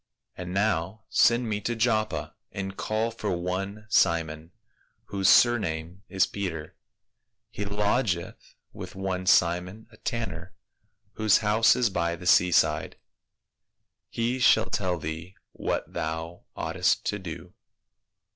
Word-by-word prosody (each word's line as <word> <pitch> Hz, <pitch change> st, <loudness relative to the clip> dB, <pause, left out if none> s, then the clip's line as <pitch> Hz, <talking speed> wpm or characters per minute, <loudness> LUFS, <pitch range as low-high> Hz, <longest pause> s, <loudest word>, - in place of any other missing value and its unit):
And 90 Hz, 0 st, -6 dB
now 95 Hz, 0 st, -1 dB
send 120 Hz, 0 st, +3 dB
men 105 Hz, -1 st, -2 dB
to 120 Hz, +3 st, -2 dB
Joppa, 110 Hz, -1 st, 0 dB, 0.2 s
and 95 Hz, 0 st, -5 dB
call 110 Hz, +3 st, -1 dB
for 105 Hz, -5 st, -3 dB
one 95 Hz, +4 st, -4 dB
Simon, 85 Hz, -4 st, +1 dB, 0.6 s
whose 95 Hz, -1 st, +2 dB
surname 90 Hz, -7 st, +3 dB
is 95 Hz, -2 st, +3 dB
Peter; 85 Hz, -6 st, -5 dB, 0.8 s
he 100 Hz, -, -4 dB
lodgeth 100 Hz, -2 st, -1 dB, 0.2 s
with -, -, -9 dB
one 95 Hz, -1 st, -3 dB
Simon, 90 Hz, +6 st, +2 dB
a 110 Hz, -, -17 dB
tanner, 95 Hz, -8 st, -5 dB, 0.6 s
whose 110 Hz, -1 st, +3 dB
house 110 Hz, +2 st, +5 dB
is 120 Hz, -4 st, +1 dB
by 85 Hz, -2 st, 0 dB
the 90 Hz, -, -11 dB
sea 90 Hz, 0 st, +5 dB
side: 75 Hz, -2 st, +2 dB, 1.1 s
he 120 Hz, +3 st, -1 dB
shall 110 Hz, -3 st, +5 dB
tell 90 Hz, -3 st, 0 dB
thee 80 Hz, +4 st, -6 dB, 0.2 s
what -, -, -3 dB
thou 80 Hz, +2 st, -4 dB
oughtest -, -, 0 dB
to 105 Hz, -, -1 dB
do.' 90 Hz, 0 st, -8 dB
95 Hz, 125 wpm, -27 LUFS, 85-110 Hz, 1.1 s, house